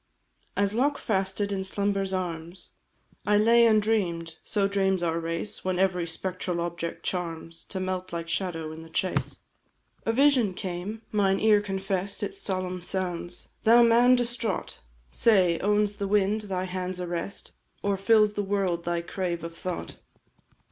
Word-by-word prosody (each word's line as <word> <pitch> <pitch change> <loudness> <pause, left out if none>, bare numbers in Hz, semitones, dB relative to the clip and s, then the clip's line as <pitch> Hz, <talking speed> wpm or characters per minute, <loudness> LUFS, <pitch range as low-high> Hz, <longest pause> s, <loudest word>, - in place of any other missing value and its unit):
As 200 0 +2
lockfasted 205 -6 0
in 195 -1 -1
slumber's 195 0 0
arms 175 -1 -4 0.5
I 210 0 +3
lay 230 +2 +6
and 215 -1 +5
dream'd 170 -7 -1
(so 200 -1 +1
dreams 195 -2 +1
our 165 -1 0
race 165 +5 -2
When 185 -1 0
every 180 -2 +1
spectral 180 +1 -2
object 170 0 -4
charms, 165 -2 -4
To 190 - -4
melt, 185 0 -3
like 170 -1 -4
shadow, 165 -3 -2
in 160 +1 -8
the 165 - -12
chase), 185 +3 -1 0.6
A 225 - +1
vision 250 -6 +3
came; 195 +4 -5
mine 195 -2 +2
ear 215 -1 +5
confess'd 195 -1 -3
Its 400 0 -5
solemn 185 -2 -3
sounds. 180 -1 -4
"Thou 235 +2 +7
man 240 +2 +6
distraught! 235 -4 -2 0.3
Say, 185 -7 +3
owns 205 +1 +1
the 200 -1 -2
wind 205 +1 +2
thy 185 -1 -1
hand's 185 0 -4
arrest, 175 +2 -5 0.3
Or 200 0 +1
fills 210 +1 +4
the 205 - -1
world 195 -4 -1
thy 175 0 0
crave 170 -1 -3
of 165 0 -6
thought? 180 +1 -5
190 Hz, 150 wpm, -27 LUFS, 175-210 Hz, 0.6 s, Thou